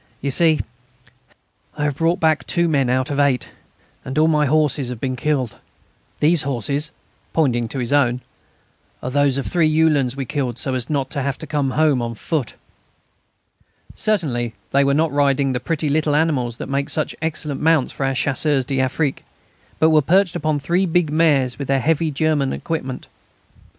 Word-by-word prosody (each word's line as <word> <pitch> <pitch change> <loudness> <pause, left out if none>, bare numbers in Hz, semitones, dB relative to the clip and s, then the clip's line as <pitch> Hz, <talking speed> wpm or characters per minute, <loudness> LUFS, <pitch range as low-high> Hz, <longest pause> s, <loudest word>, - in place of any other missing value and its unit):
You 140 - -2
see,... 160 +1 +4 1.2
I 145 - -2
have 145 -2 0
brought 165 +3 +1
back 160 -2 +1
two 170 -1 +1
men 140 -5 +1
out 130 +3 0
of 140 - -1
eight, 140 -3 +1 0.5
and 130 - -6
all 155 +1 +4
my 150 -2 +2
horses 145 -3 +1
have 125 -3 -6
been 130 +1 -2
killed.... 130 -3 -1 0.6
These 160 +1 +4
horses" 140 +3 -2 0.4
pointing 120 -7 +1
to 135 - -6
his 125 +1 -1
own 125 -3 +2 0.8
"are 125 - -3
those 140 -1 +2
of 140 - -3
three 165 -3 +2
Uhlans 155 -5 +2
we 135 -1 -4
killed 130 -3 -3
so 130 +2 -2
as 125 -2 -3
not 140 -3 -1
to 140 - -2
have 140 -1 -2
to - - -7
come 145 -3 -1
home 150 -5 +3
on 115 0 -4
foot." 150 +2 -3 1.4
Certainly 125 - -1 0.2
they 140 +1 +3
were 140 0 +2
not 160 +1 +1
riding 140 -1 +1
the 125 - -1
pretty 155 +3 -2
little 150 0 +1
animals 135 -7 0
that - - -6
make 140 +1 -2
such 155 - -1
excellent 155 -3 -3
mounts 160 -4 +2
for - - -4
our 135 0 0
Chasseurs 135 0 +1
d'Afrique, 135 +2 -1 0.5
but 160 0 +4
were 155 -1 +5
perched 180 +5 +2
on 155 -1 +1
three 175 +6 0
big 170 -2 +1
mares 145 -6 +2
with 140 - -4
the 135 - +2
heavy 160 +4 +1
German 150 -1 0
equipment. 150 -6 -4
145 Hz, 180 wpm, -20 LUFS, 130-155 Hz, 1.4 s, were